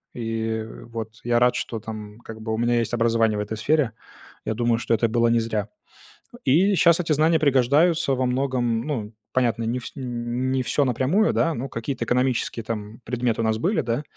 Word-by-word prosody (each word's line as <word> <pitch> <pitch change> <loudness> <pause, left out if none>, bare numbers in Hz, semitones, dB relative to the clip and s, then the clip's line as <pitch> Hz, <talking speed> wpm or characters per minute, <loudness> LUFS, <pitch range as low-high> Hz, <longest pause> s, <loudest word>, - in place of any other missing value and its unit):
И 115 -1 -2 0.2
вот. 115 -2 -6
Я 120 0 +2
рад, 125 0 +4
что 115 - -3
там 105 -1 -8
как 110 -2 -10
бы 110 0 -4
у - - -1
меня 120 0 +2
есть 115 - -2
образование 115 -2 +2
в - - -1
этой 105 +1 -4
сфере. 140 +2 +1 0.5
Я 110 - -1
думаю, 120 0 +1
что 115 - -1
это 115 +1 +1
было 120 +1 +2
не 115 0 +3
зря. 110 -2 -2 0.8
И 185 +9 +4
щас 170 0 +5
эти 165 - -3
знания 160 +2 +3
пригождаются 140 +3 +3
во 130 - 0
многом, 125 -3 0
ну, 115 -7 -3 0.2
понятно, 120 -3 +1
не 120 +3 -1
вс - - -8
не 135 - -6 0.6
не 130 - 0
всё 140 +3 +1
напрямую, 135 - +2
да, 165 -1 +2
но 130 +3 -4
какие-то 120 +3 -4
экономические 125 -2 0
там 110 +1 -6
предметы 120 -1 -1
у - - 0
нас 110 0 +1
были, 185 - +1
да. 120 +5 -2
120 Hz, 200 wpm, -24 LUFS, 115-135 Hz, 0.8 s, щас